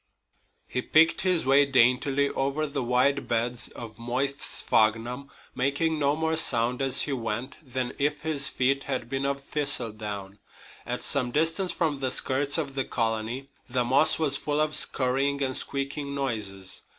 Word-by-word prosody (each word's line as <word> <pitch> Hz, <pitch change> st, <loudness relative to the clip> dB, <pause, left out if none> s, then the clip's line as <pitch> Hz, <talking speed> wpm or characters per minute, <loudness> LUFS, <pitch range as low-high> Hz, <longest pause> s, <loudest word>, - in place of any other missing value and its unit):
He 125 Hz, -, -3 dB
picked 160 Hz, +5 st, +3 dB
his 180 Hz, -5 st, +2 dB
way 135 Hz, +2 st, +5 dB
daintily 135 Hz, +1 st, +2 dB
over 140 Hz, +3 st, -1 dB
the 140 Hz, -2 st, -3 dB
wide 130 Hz, +2 st, +1 dB
beds 120 Hz, +1 st, -1 dB
of 115 Hz, -2 st, -10 dB
moist 130 Hz, +4 st, -2 dB
sphagnum, 120 Hz, +5 st, 0 dB, 0.2 s
making 145 Hz, +5 st, 0 dB
no 145 Hz, 0 st, +2 dB
more 160 Hz, +1 st, -1 dB
sound 125 Hz, -4 st, +4 dB
as 135 Hz, -1 st, +4 dB
he 145 Hz, -, -2 dB
went 120 Hz, +2 st, -4 dB
than 130 Hz, -3 st, -4 dB
if 145 Hz, +1 st, 0 dB
his 150 Hz, -3 st, 0 dB
feet 135 Hz, +2 st, 0 dB
had 130 Hz, -4 st, -3 dB
been 135 Hz, 0 st, -2 dB
of 140 Hz, 0 st, -3 dB
thistledown. 105 Hz, -9 st, -1 dB, 0.5 s
At -, -, -3 dB
some 130 Hz, -3 st, +1 dB
distance 165 Hz, +7 st, +1 dB
from 155 Hz, -5 st, -1 dB
the 130 Hz, -1 st, -1 dB
skirts 140 Hz, +3 st, 0 dB
of 145 Hz, -4 st, -3 dB
the 135 Hz, -1 st, -1 dB
colony 115 Hz, +3 st, -3 dB, 0.2 s
the 125 Hz, 0 st, 0 dB
moss 135 Hz, +6 st, +4 dB
was 145 Hz, -3 st, +2 dB
full 150 Hz, 0 st, -2 dB
of 155 Hz, 0 st, +2 dB
scurrying 140 Hz, 0 st, +1 dB
and 130 Hz, -1 st, -2 dB
squeaking 140 Hz, +1 st, -4 dB
noises. 105 Hz, -8 st, -4 dB
135 Hz, 160 wpm, -26 LUFS, 120-145 Hz, 0.5 s, way